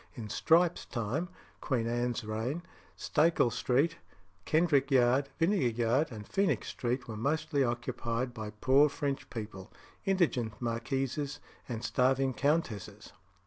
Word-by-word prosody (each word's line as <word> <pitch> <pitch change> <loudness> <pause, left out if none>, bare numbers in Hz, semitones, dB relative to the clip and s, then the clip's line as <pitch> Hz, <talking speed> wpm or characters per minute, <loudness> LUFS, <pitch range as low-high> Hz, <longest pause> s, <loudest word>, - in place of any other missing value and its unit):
In 110 -5 -7
Strype's 170 +6 +3
time 130 +9 -2 0.3
(Queen 125 -5 -1
Anne's 120 0 -1
reign), 115 +10 -3 0.3
Stacie 155 -6 +2
Street, 140 +8 +1 0.5
Kendrick 155 -4 +3
Yard, 130 +1 +3
Vinegar 165 -5 +2
Yard, 125 +7 +2
and 105 -3 -8
Phoenix 195 0 0
Street, 125 +1 -2
were 110 - -5
mostly 145 +4 0
occupied 120 0 -2
by 110 -2 -5
poor 130 +7 +4
French 140 -1 -3
people; 105 -5 -7 0.3
indigent 155 - +1
marquises 135 +4 -2 0.3
and 115 -2 -4
starving 130 +1 +2
countesses. 140 - -1
130 Hz, 120 wpm, -31 LUFS, 115-150 Hz, 0.5 s, poor